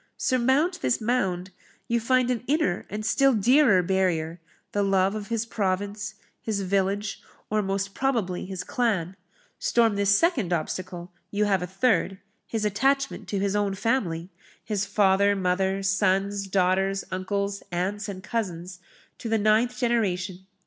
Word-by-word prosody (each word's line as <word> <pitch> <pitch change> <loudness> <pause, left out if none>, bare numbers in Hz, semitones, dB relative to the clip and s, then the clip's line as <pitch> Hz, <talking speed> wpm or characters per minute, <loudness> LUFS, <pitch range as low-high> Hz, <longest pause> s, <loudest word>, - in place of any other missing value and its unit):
Surmount 265 +8 +1
this - - +1
mound, 190 -6 -1 0.4
you 235 -1 +1
find 255 +2 +2
an 240 -2 -2
inner 265 - 0
and 215 +1 -4
still 270 +2 +3
dearer 230 -3 +5
barrier 175 -3 0 0.3
the 205 - 0
love 195 -1 +2
of 210 -1 -5
his 230 0 -1
province, 205 -1 -2 0.3
his 215 -4 -2
village, 195 +2 -1 0.3
or, 215 0 +2
most 195 0 -2
probably, 225 -10 -1
his 190 -1 -5
clan; 195 -8 -1 0.4
storm 230 -3 +2
this 200 0 +4
second 260 - +1
obstacle, 175 +1 -3 0.2
you 210 +1 +1
have 195 -3 +2
a 180 - -3
third 195 0 +1 0.3
his 220 -2 -2
attachment 270 +7 0
to 205 - -2
his 200 +1 0
own 205 -1 0
family 190 -6 -1 0.3
his 210 -1 -1
father, 200 0 +3
mother, 190 +1 0
sons, 195 0 +1
daughters, 195 +1 +1
uncles, 200 +2 -2
aunts, 200 +4 -2
and 190 -1 -7
cousins, 185 -5 -4 0.4
to 230 - -5
the 225 - +2
ninth 220 +4 +2
generation. 190 -6 -1
200 Hz, 145 wpm, -26 LUFS, 190-230 Hz, 0.4 s, dearer